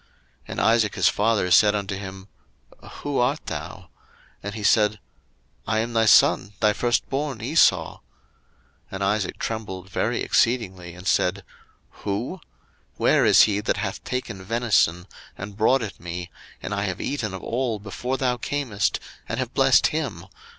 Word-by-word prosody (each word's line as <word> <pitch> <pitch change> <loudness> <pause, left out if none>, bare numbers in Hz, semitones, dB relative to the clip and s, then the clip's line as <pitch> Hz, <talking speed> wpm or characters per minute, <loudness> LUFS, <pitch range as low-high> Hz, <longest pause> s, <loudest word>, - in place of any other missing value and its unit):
01:027:032 - - -35 0.4
And - - -3
Isaac 110 -2 +3
his - - +3
father 105 -3 +1
said 105 +4 +6
unto 100 -1 -3
him, 95 0 -8 0.8
Who 145 -1 -1
art 130 +5 0
thou? - - -7 0.5
And 100 +1 -6
he 110 - -6
said, 105 0 +3 0.7
I 110 - +1
am 115 +2 -1
thy 115 0 +3
son, 100 -1 +5
thy 105 0 +3
firstborn 135 +3 -1
Esau. 140 +9 +3
01:027:033 - - -31 0.9
And 95 0 -3
Isaac 100 -1 0
trembled 95 -5 -5
very - - -1
exceedingly, 95 -8 0
and 90 +1 -12
said, 90 -1 +1 0.6
Who? 115 - -3 0.5
where - - +3
is - - +7
he 105 -2 +1
that 105 - -1
hath 100 -2 -4
taken 125 -7 -4
venison, 100 -6 +1 0.3
and 100 +1 -7
brought 115 +4 +3
it 105 - -7
me, 85 0 -6 0.3
and - - -4
I 100 0 -1
have 90 -3 -3
eaten 110 -9 -3
of 95 - -9
all 120 -2 -1
before 115 +6 -4
thou 125 -2 0
camest, 120 -8 -1 0.3
and - - -2
have - - -3
blessed - - +4
him? - - -3
105 Hz, 155 wpm, -24 LUFS, 95-120 Hz, 0.9 s, is